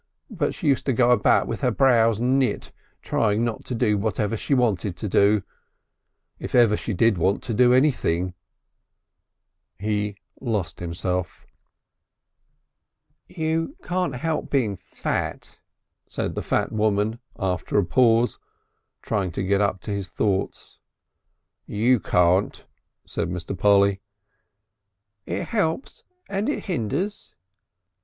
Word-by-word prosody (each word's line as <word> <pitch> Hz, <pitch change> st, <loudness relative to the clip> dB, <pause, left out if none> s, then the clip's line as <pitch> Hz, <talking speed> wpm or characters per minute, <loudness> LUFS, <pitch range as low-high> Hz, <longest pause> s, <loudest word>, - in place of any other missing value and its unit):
But 170 Hz, -9 st, -1 dB
she 160 Hz, -, -4 dB
used 140 Hz, -1 st, +2 dB
to 135 Hz, -, +3 dB
go 120 Hz, +1 st, +3 dB
about 120 Hz, -4 st, +4 dB
with -, -, -4 dB
her -, -, +2 dB
brows 115 Hz, -5 st, +3 dB
knit 130 Hz, +2 st, 0 dB, 0.3 s
trying 110 Hz, 0 st, +1 dB
not 115 Hz, -2 st, -3 dB
to 125 Hz, -, -4 dB
do 105 Hz, -2 st, +1 dB
whatever 105 Hz, +1 st, -1 dB
she 140 Hz, +5 st, 0 dB
wanted 105 Hz, -7 st, 0 dB
to 105 Hz, -, -4 dB
do 100 Hz, +1 st, +3 dB, 1.0 s
if -, -, -4 dB
ever 115 Hz, -4 st, +5 dB
she 110 Hz, -, -4 dB
did 105 Hz, 0 st, +2 dB
want 95 Hz, +4 st, +1 dB
to 120 Hz, -, -3 dB
do 125 Hz, +3 st, +5 dB
anything 105 Hz, -, +2 dB, 0.7 s
" -, -, -56 dB
He 105 Hz, -1 st, -1 dB, 0.2 s
lost 105 Hz, -10 st, -2 dB
himself. 90 Hz, +1 st, -3 dB, 1.8 s
"You 160 Hz, -, -2 dB
can't 180 Hz, -3 st, -1 dB
help 155 Hz, +4 st, -2 dB
being 115 Hz, -8 st, +1 dB
fat," -, -, -4 dB, 0.5 s
said -, -, -3 dB
the -, -, -3 dB
fat -, -, 0 dB
woman 110 Hz, +1 st, 0 dB, 0.2 s
after 95 Hz, -2 st, -1 dB
a 100 Hz, -, +3 dB
pause, 115 Hz, +4 st, +3 dB, 0.6 s
trying 100 Hz, -4 st, -1 dB
to 95 Hz, -, -2 dB
get 100 Hz, +1 st, +2 dB
up 100 Hz, -2 st, 0 dB
to -, -, -5 dB
his 100 Hz, -1 st, -3 dB
thoughts. 100 Hz, -2 st, -2 dB, 0.9 s
"You 120 Hz, +4 st, +2 dB
can't," 90 Hz, +1 st, +1 dB, 0.4 s
said -, -, -3 dB
Mr. 90 Hz, +2 st, -4 dB
Polly. 100 Hz, 0 st, +3 dB, 1.3 s
"It -, -, -3 dB
helps 205 Hz, 0 st, -2 dB, 0.2 s
and 200 Hz, +4 st, -1 dB
it 295 Hz, -, -2 dB
hinders." 180 Hz, -, -3 dB
110 Hz, 130 wpm, -24 LUFS, 100-125 Hz, 1.8 s, ever